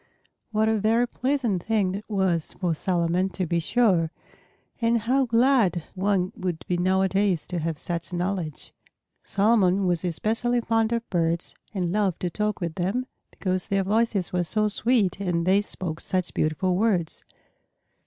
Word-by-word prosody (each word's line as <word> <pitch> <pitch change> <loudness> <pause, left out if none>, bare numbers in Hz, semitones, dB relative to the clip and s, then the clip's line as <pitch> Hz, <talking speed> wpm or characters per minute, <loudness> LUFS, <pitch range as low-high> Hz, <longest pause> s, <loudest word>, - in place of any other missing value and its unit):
What 220 -1 +1
a 220 -1 +2
very 225 +4 +2
pleasant 250 -8 -1
thing 210 -4 +1
that 200 +4 -6
was 190 -6 0
for 175 -3 -1
Solomon, 175 +2 0
to 185 - 0
be 170 +1 0
sure! 180 -3 +2 0.7
And 230 0 +2
how 260 +4 +2
glad 230 - +3
one 190 -1 0
would 180 -3 -4
be 180 - 0
nowadays 190 0 +1
to 180 - -2
have 165 -1 -2
such 170 +2 -4
knowledge! 175 -4 -3 0.5
Solomon 200 -2 +3
was 175 -2 +1
especially 225 +8 0
fond 225 -1 +1
of 235 0 -1
birds, 170 -1 0 0.2
and 180 -4 -2
loved 200 -3 0
to 180 - -1
talk 210 +3 -1
with 170 -2 -2
them 195 +9 -1 0.2
because 185 -2 -2
their 195 -1 +1
voices 205 -2 0
were 180 -1 +1
so 215 +5 +1
sweet 215 -3 +1
and 175 -4 -1
they 190 +2 +4
spoke 175 -5 -5
such 185 -1 -2
beautiful 180 +4 0
words. 185 -5 0
190 Hz, 155 wpm, -25 LUFS, 175-220 Hz, 0.7 s, they